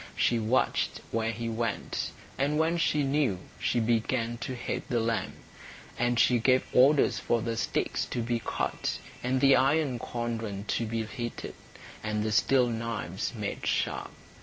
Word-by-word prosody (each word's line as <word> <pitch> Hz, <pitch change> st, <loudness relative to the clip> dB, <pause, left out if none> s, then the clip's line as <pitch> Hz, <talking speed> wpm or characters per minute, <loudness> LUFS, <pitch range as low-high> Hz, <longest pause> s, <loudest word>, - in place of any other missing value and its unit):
She 120 Hz, -, +2 dB
watched 115 Hz, +4 st, +1 dB
where 115 Hz, 0 st, 0 dB
he 115 Hz, +1 st, -4 dB
went, 115 Hz, 0 st, -2 dB, 0.3 s
and 145 Hz, +2 st, +1 dB
when 165 Hz, +2 st, +2 dB
she 150 Hz, -3 st, +2 dB
knew 135 Hz, -7 st, +1 dB, 0.2 s
she 120 Hz, -, +1 dB
began 115 Hz, +1 st, 0 dB
to 130 Hz, -1 st, -4 dB
hate 120 Hz, -, -4 dB
the 120 Hz, -, +1 dB
lamb; 115 Hz, 0 st, -1 dB, 0.6 s
and 120 Hz, 0 st, +1 dB
she 125 Hz, 0 st, +5 dB
gave 130 Hz, +2 st, +3 dB
orders 140 Hz, +3 st, +5 dB
for 115 Hz, -2 st, 0 dB
the 115 Hz, -1 st, -1 dB
sticks 115 Hz, -, -1 dB
to 120 Hz, -, -3 dB
be 120 Hz, 0 st, 0 dB
cut, -, -, -2 dB, 0.2 s
and 130 Hz, +1 st, +1 dB
the 135 Hz, 0 st, +6 dB
iron 135 Hz, -2 st, +2 dB
cauldron 115 Hz, -4 st, -3 dB
to 115 Hz, -, 0 dB
be 115 Hz, 0 st, -2 dB
heated, 120 Hz, +2 st, -5 dB, 0.5 s
and 105 Hz, 0 st, -1 dB
the 110 Hz, -, -1 dB
steel 125 Hz, +4 st, +4 dB
knives 115 Hz, -5 st, -3 dB
made 105 Hz, -3 st, -4 dB
sharp. -, -, 0 dB
120 Hz, 160 wpm, -29 LUFS, 115-130 Hz, 0.6 s, the